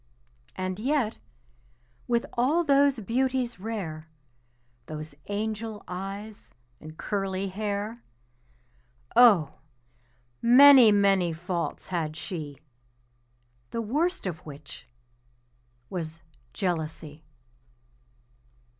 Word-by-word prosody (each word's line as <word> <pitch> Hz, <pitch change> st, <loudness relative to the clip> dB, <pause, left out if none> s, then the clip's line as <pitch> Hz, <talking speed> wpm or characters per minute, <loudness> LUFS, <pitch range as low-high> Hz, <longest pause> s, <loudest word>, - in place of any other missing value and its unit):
And 185 Hz, +1 st, -3 dB
yet, 255 Hz, -2 st, 0 dB, 0.9 s
with 235 Hz, -1 st, +1 dB
all 285 Hz, +8 st, +2 dB
those 280 Hz, -3 st, +3 dB
beauties 250 Hz, 0 st, -1 dB
rare, 180 Hz, -8 st, -5 dB, 0.8 s
Those 155 Hz, -1 st, -7 dB
angel 215 Hz, +1 st, -4 dB
eyes 195 Hz, -, -7 dB, 0.3 s
and 155 Hz, +1 st, -11 dB
curly 195 Hz, -1 st, -2 dB
hair, 210 Hz, +3 st, -3 dB, 1.1 s
Oh! 205 Hz, -, +5 dB, 0.8 s
many, 255 Hz, -1 st, +8 dB
many 195 Hz, -4 st, +3 dB
faults 170 Hz, +1 st, -4 dB
had 160 Hz, -4 st, -2 dB
she, 150 Hz, -7 st, -6 dB, 1.1 s
The 230 Hz, -, -3 dB
worst 310 Hz, -, -1 dB
of 175 Hz, -4 st, -3 dB
which 145 Hz, -2 st, -12 dB, 1.0 s
was 165 Hz, -2 st, -6 dB, 0.3 s
jealousy. 160 Hz, -1 st, -4 dB
200 Hz, 80 wpm, -27 LUFS, 165-235 Hz, 1.1 s, many